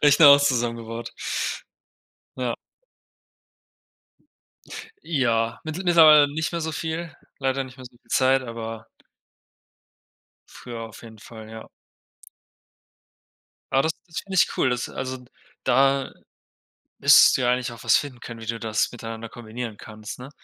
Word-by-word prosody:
Rechner 145 +1 +7
auch 140 0 +8
zusammengebaut. 115 -3 -2 1.3
Ja. 125 -2 -2 2.5
Ja, 115 -7 0
mittl 160 +4 -5
mittlerweile 155 -4 +7
nicht 160 +2 -2
mehr 170 - -2
so 160 0 -2
viel, 160 +1 -4 0.3
leider 135 0 0
nicht 130 +1 -13
mehr 130 - -11
so 125 - -11
viel - - -32
Zeit, 130 0 +3
aber 115 -2 -7 1.6
Früher 120 -2 -9
auf 115 0 -10
jeden 110 -2 -13
Fall, 110 0 -12
ja. 110 0 -10 2.0
Ja, 135 - +4
das 160 +3 +1
das 165 - -7
finde 195 -1 -8
ich - - +3
cool, 130 - +3
das 125 -1 -2
also, 130 -1 -5 0.4
da 135 +1 +2 0.9
müsstest - - +7
du - - -4
ja 125 - +2
eigentlich 125 -1 -2
auch 115 - -11
was - - +4
finden 130 -4 -3
können, 115 -1 -9
wie 115 - -9
du 115 0 -3
das 110 0 -1
miteinander 115 -1 -7
kombinieren 115 -1 -7
kannst, 110 +1 -10
ne? 130 +3 -9
125 Hz, 140 wpm, -24 LUFS, 115-140 Hz, 2.5 s, auch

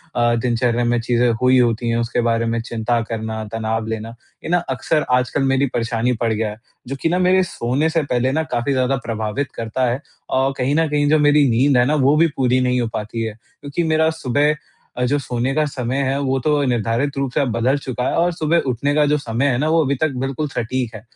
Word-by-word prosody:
अ, 120 0 +2
दिनचर्या 120 0 0
में 120 0 +1
चीज़ें 120 +1 +1
हुई 130 0 +4
होती 120 -1 +1
हैं 115 - +1
उसके 120 +1 0
बारे 115 0 +1
में 115 0 -1
चिंता 115 0 -1
करना, 110 -1 -4
तनाव 110 0 -2
लेना, 110 +1 -5 0.3
ये - - -5
न 175 0 +2
अक्सर 145 +4 0
आजकल 125 +2 +1
मेरी 135 +1 +2
परेशानी 120 +1 0
पड़ 115 -1 +1
गया 110 0 -1
है 105 +1 -9 0.3
जो 135 - -4
कि 165 - +1
न 180 +2 +1
मेरे 185 +1 +4
सोने 140 -1 -1
से 160 -1 0
पहले 130 -1 0
न 160 +3 0
काफ़ी 120 +3 0
ज़्यादा 130 +1 +1
प्रभावित 110 +4 -3
करता 115 +3 -2
है 130 +4 -3 0.3
और 135 +1 +1
कहीं 130 +3 0
न 165 0 +2
कहीं 145 0 +1
जो 155 - +4
मेरी 145 0 +4
नींद 130 +3 +3
है 125 - +4
न 150 - +1
वो 140 +3 +4
भी 165 +1 +5
पूरी 130 -1 +2
नहीं 125 0 +1
हो 115 - -1
पाती 110 +2 -4
है। 110 -1 -3
क्योंकि 140 +8 -6
मेरा 160 0 +2
सुबह 145 -1 +1 0.4
अ, 125 - 0
जो 145 +4 +1
सोने 125 0 -2
का 155 - +3
समय 130 -3 -3
है 135 +1 0
वो 135 -1 0
तो 150 -1 +2
निर्धारित 120 +4 -1
रूप 135 -2 -1
से - - +1
अब 130 -4 0
बदल 125 +5 +1
चुका 130 -2 -4
है - - -1
और 175 +1 +2
सुबह 165 +1 +1
उठने 130 +3 0
का 150 - +4
जो 150 +1 +2
समय 125 -1 -2
है 130 -3 +1
ना 150 +4 0
वो 165 0 +3
अभी 140 0 0
तक 155 -1 +2
बिल्कुल 135 +3 -2
सटीक 120 -3 -3
है। 105 - -8
125 Hz, 240 wpm, -20 LUFS, 115-145 Hz, 0.4 s, भी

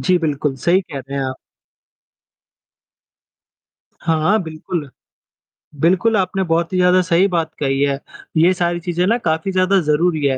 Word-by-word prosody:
जी, 185 -1 +2
बिल्कुल 150 -3 -1
सही 175 +8 +2
कह 150 -7 -8
रहे 135 +1 -7
हैं 135 - -1
आप। 130 0 -4 2.7
हाँ, 165 +6 +1
बिल्कुल। 160 -1 -5 0.9
बिल्कुल 190 +8 +2
आपने 190 0 0
बहुत 170 0 0
ही - - +1
ज़्यादा 180 0 +4
सही 180 +2 +3
बात 165 -4 -1
कही 135 -1 0
है। 140 -1 +1 0.4
ये 175 +4 +5
सारी 175 -1 -1
चीजें 175 +1 -1
ना 230 +3 +3
काफ़ी 160 +4 0
ज़्यादा 190 +1 +3
ज़रूरी 155 0 +1
है 135 -1 +1
170 Hz, 150 wpm, -19 LUFS, 150-185 Hz, 2.7 s, ये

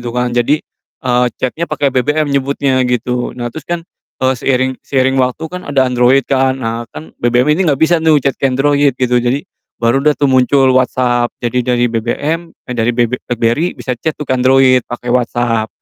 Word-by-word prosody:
gitu 120 - -5
kan. 125 0 -2
Jadi, 120 +6 +1 0.4
eee, 125 -1 +2
chat-nya 160 +7 -3
pake 145 -3 0
BBM 150 +5 +1
nyebutnya, 135 -1 0
gitu. 125 +1 -2
Nah, 120 -1 -4
terus 155 - -9
kan, 170 -1 -3 0.4
eee, 130 - +3
seiring 130 0 +1
seiring 130 -1 +1
waktu 130 +5 -1
kan 180 -3 -7
ada 135 -2 +2
Android 125 +2 +3
kan? 130 -1 +1
Nah, 115 +1 -3
kan 80 +1 -11
BBM 125 +5 +2
ini 180 +2 +1
nggak 145 - +2
bisa 160 +4 +2
nih 160 -1 +4
chat 140 - +2
ke 135 - +2
Android, 140 +1 +2
gitu. 125 -1 +1
Jadi, 125 +4 -1 0.3
baru 120 +3 +1
dah 150 +1 +2
tuh 145 - +1
muncul 130 0 +3
WhatsApp, 125 -1 +1
jadi 125 +1 -1
dari 120 - +2
BBM 145 +9 -2 0.2
eh, 125 - -4
dari 115 0 +1
BB 120 0 +1
BlackBerry, 120 +8 0
bisa 130 - -3
chat 140 +7 -2
tuh 150 - -4
ke - - -1
Android 130 0 +4
pake 120 0 -7
WhatsApp, 120 -2 0
130 Hz, 195 wpm, -14 LUFS, 120-140 Hz, 0.4 s, nih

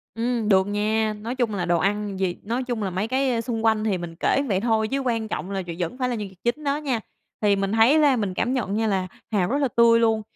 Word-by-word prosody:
Ừm, 230 -2 -1
được 190 0 +4
nha, 215 +1 0
nói 235 +4 -4
chung 240 -4 0
là 175 -2 -1
đồ 175 -1 +2
ăn 200 0 -1
gì 180 -2 0
nói 235 +5 -2
chung 240 -4 -3
là 190 - -1
mấy 190 +4 -2
cái, 260 +1 +1
a, 230 -1 0
xung 225 -1 -3
quanh 220 -1 +3
thì 200 -4 0
mình 170 -1 -7
kể 275 - +2
vậy 190 -3 +1
thôi 220 -1 +1
chứ 275 +3 -1
quan 230 -4 -1
trọng 200 -2 -4
là 195 - -2
v - - -9
vẫn 175 +8 -3
phải 250 0 0
là 240 - -1
nhân 210 -2 -4
vật 190 - -16
chính 245 +6 -1
đó 280 0 0
nha. 270 -6 -1 0.4
Thì 205 -1 +4
mình 195 0 -1
thấy 230 +8 +5
ra 285 -4 +4
mình 205 -5 -2
cảm 245 +7 0
nhận 210 -6 -1
nha 220 0 +1
là 190 -2 0 0.2
hàu 190 -4 +1
rất 280 - +1
là 280 -2 +2
tươi 230 0 +6
luôn, 225 -1 +2
220 Hz, 285 wpm, -24 LUFS, 200-245 Hz, 0.4 s, tươi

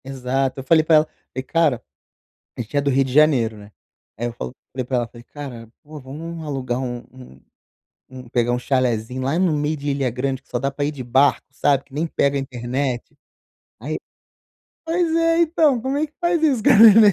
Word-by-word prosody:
Exato. 135 0 -2
Eu - - -6
falei 160 +4 +4
pra 160 0 +4
ela, 155 0 +5
falei: 130 -4 -9
"Cara" 150 -4 +1 0.7
a - - -2
gente 120 +5 -5
é - - +4
do 140 - 0
Rio 135 0 +3
de 130 - -5
Janeiro, 135 -7 +4
né, 105 0 -13 0.5
aí 120 - -3
eu 120 - -5
falo 65 - -6 0.2
falei 130 0 -2
para 125 0 -1
ela, 120 -1 -1
falei: 120 +1 -14
"Cara, 125 -5 -9
pô, 150 0 -10
vamos 160 +5 -7
alugar 130 -4 -2
um 125 -2 -3
um 125 - -14 0.7
um 130 -1 -11
pegar 120 -1 +1
um 120 - 0
chalezinho 125 -1 -1
lá 135 +5 0
no 180 -3 +2
meio 150 +1 0
de 145 0 -3
Ilha 140 -2 0
Grande 130 +2 -2
que - - -35
só 120 - -2
dá 135 +1 0
pra 145 +1 -3
ir 145 - -1
de 140 -3 -7
barco, 130 +4 +2
sabe, 140 0 +1
que 135 - -19
nem 155 +3 -1
pega 140 -3 +1
a - - +1
internet". 130 +1 -3 0.6
Aí - - -4 0.9
pois 330 0 0
é, 330 0 +3
então, 310 -6 +3
como 265 +4 -2
é 310 - +1
que 300 - -31
faz 345 -2 +1
isso 275 -8 +2
com - - +4
a - - +7
neném 215 -1 +9
135 Hz, 220 wpm, -21 LUFS, 125-160 Hz, 0.9 s, neném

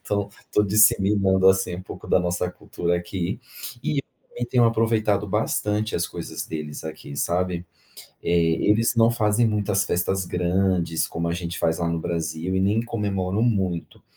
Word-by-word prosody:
então, 100 -1 -1 0.2
tô 105 - +3
disseminando, 100 -2 +4
assim, 95 -2 +2
um 95 - -7
pouco - - -10
da - - +4
nossa 90 0 -1
cultura 85 -1 -2
aqui 90 0 -3 0.4
e 140 -2 0 0.3
também 120 - -5
tenho 120 -1 +3
aproveitado 110 -3 +2
bastante 105 +1 -1
as - - 0
coisas - - -6
deles 75 -2 -6
aqui, 80 -2 -8
sabe. 90 +3 -1 0.6
Eh, - - -2 0.4
eles 115 +3 +3
não 115 0 +5
fazem 115 0 +2
muitas 105 -2 +1
festas 95 0 0
grandes 90 -2 +1
como 85 +1 -3
a - - 0
gente 85 0 -4
faz 80 +1 +1
lá 85 - 0
no 85 -1 -1
Brasil 85 +2 -2
e - - +2
nem 100 +4 +2
comemoram 100 -3 -1
muito, 95 -8 -1
95 Hz, 160 wpm, -24 LUFS, 85-105 Hz, 0.6 s, não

